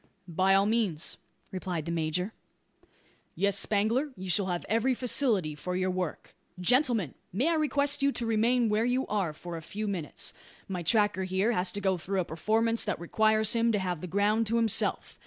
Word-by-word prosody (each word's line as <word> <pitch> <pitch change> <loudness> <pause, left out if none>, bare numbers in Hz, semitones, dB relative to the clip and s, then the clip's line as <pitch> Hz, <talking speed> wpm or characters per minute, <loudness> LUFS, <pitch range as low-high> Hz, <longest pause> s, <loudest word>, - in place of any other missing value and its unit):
"By 185 +3 +2
all 195 +1 +4
means," 210 -8 0 0.3
replied 180 -4 -4
the 170 - -3
major. 170 +5 -1 1.0
"Yes, 200 +2 +1
Spangler, 220 +8 +1
you 185 0 -4
shall 200 +1 +2
have 175 -1 -3
every 230 +4 +1
facility 230 - +1
for 180 +5 -5
your 185 0 0
work. 180 -4 -5 0.2
Gentlemen! 235 - +2 0.2
may 250 - +1
I - - +2
request 290 -3 +2
you 280 0 +3
to 240 - -3
remain 230 +2 +2
where 215 +1 +1
you 250 +2 0
are 200 -6 -1
for 170 +2 -8
a - - -7
few 210 +6 -5
minutes. 180 -7 -3 0.3
My 185 -2 -4
tracker, 205 +1 +2
here, 190 +5 +1
has 180 -4 0
to 205 - -4
go 190 -2 +1
through 190 +3 -1
a - - -4
performance 225 +8 +1
that - - -2
requires 215 +5 +2
him 230 0 +2
to - - +2
have 180 -4 -3
the 180 - -5
ground 205 +5 +1
to 230 - 0
himself. 225 -2 +1
200 Hz, 190 wpm, -29 LUFS, 180-230 Hz, 1.0 s, all